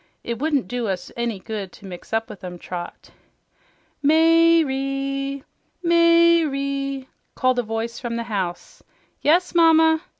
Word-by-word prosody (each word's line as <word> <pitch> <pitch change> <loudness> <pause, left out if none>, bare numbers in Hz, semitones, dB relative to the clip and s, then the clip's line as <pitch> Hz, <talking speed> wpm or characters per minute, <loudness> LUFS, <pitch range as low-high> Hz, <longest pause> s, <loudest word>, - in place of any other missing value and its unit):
"It 235 -1 -4
wouldn't 290 -2 0
do 245 -2 -3
us 180 -2 -4
any 235 -3 -2
good 200 -1 -6
to - - -14
mix 180 -2 -10
up 225 0 0
with 205 -2 -12
'em, 180 -1 -7
Trot." 175 0 -8 0.9
"May 330 +2 +5
re! 275 0 -3 0.4
May 335 0 +5
re!" 275 -2 -3 0.3
called 255 -1 +1
a - - +3
voice 225 +1 -4
from 240 -2 -4
the 235 - -2
house. 190 -6 -5 0.4
"Yes, 345 +5 +2
Mamma!" 320 -1 +5
275 Hz, 140 wpm, -22 LUFS, 225-320 Hz, 0.9 s, May